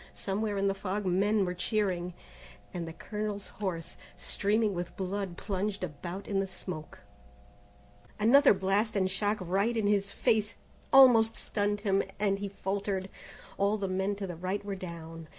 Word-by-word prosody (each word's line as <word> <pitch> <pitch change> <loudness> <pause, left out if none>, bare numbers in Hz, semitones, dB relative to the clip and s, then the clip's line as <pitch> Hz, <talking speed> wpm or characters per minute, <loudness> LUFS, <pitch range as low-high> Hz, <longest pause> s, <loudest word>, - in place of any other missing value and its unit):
Somewhere 205 +1 -2
in 195 0 +2
the 195 - +2
fog 195 +1 -3
men 195 +3 +2
were 180 - -2
cheering, 180 -2 -1 0.6
and 170 -2 -4
the - - -5
colonel's 210 +3 -4
horse, 170 -4 -3 0.2
streaming 210 +1 +1
with 175 -1 -5
blood 190 -1 -3
plunged 200 0 -2
about 175 +4 -6
in 195 -2 0
the 195 - 0
smoke. 170 -4 -7 1.2
Another 245 +3 +6
blast 195 +4 +1
and 190 -1 +2
shock, 205 +2 +1
right 195 +6 0
in 220 - +1
his 200 -1 +2
face, 215 0 +1 0.4
almost 245 -5 +7
stunned 205 0 -1
him, 195 -2 +2 0.2
and 200 -1 +1
he 200 0 -3
faltered. 195 0 -2 0.5
All 200 +2 +3
the 200 -2 -2
men 190 +2 0
to 200 0 -4
the 175 -2 -5
right 185 +4 -3
were 200 - -3
down. 165 -3 -8
195 Hz, 160 wpm, -30 LUFS, 185-210 Hz, 1.2 s, almost